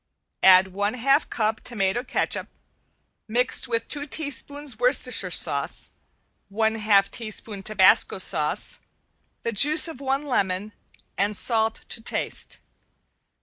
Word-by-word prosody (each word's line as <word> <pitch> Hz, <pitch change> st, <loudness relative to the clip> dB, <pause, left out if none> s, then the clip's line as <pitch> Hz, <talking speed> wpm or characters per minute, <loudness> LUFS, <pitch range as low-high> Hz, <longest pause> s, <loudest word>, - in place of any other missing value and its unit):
Add 190 Hz, 0 st, +5 dB
one 205 Hz, +4 st, -3 dB
half 275 Hz, +4 st, +1 dB
cup 220 Hz, -1 st, -2 dB
tomato 210 Hz, 0 st, -2 dB
catsup, 255 Hz, -, -3 dB, 0.8 s
mixed 245 Hz, +3 st, +4 dB
with 230 Hz, -1 st, -2 dB
two 290 Hz, 0 st, -3 dB
teaspoons 285 Hz, -4 st, -3 dB
Worcestershire 250 Hz, 0 st, +2 dB
sauce, -, -, +1 dB, 0.6 s
one 220 Hz, +2 st, 0 dB
half 210 Hz, -3 st, +1 dB
teaspoon 215 Hz, -3 st, -6 dB
tabasco 195 Hz, -1 st, +3 dB
sauce, -, -, +1 dB, 0.6 s
the 230 Hz, -, -2 dB
juice 300 Hz, -, +5 dB
of 315 Hz, -5 st, -9 dB
one 270 Hz, +1 st, -2 dB
lemon, 200 Hz, -6 st, -2 dB, 0.5 s
and 205 Hz, +1 st, +1 dB
salt 225 Hz, -2 st, 0 dB
to 225 Hz, -, -5 dB
taste. -, -, -2 dB
225 Hz, 115 wpm, -23 LUFS, 205-260 Hz, 0.8 s, Add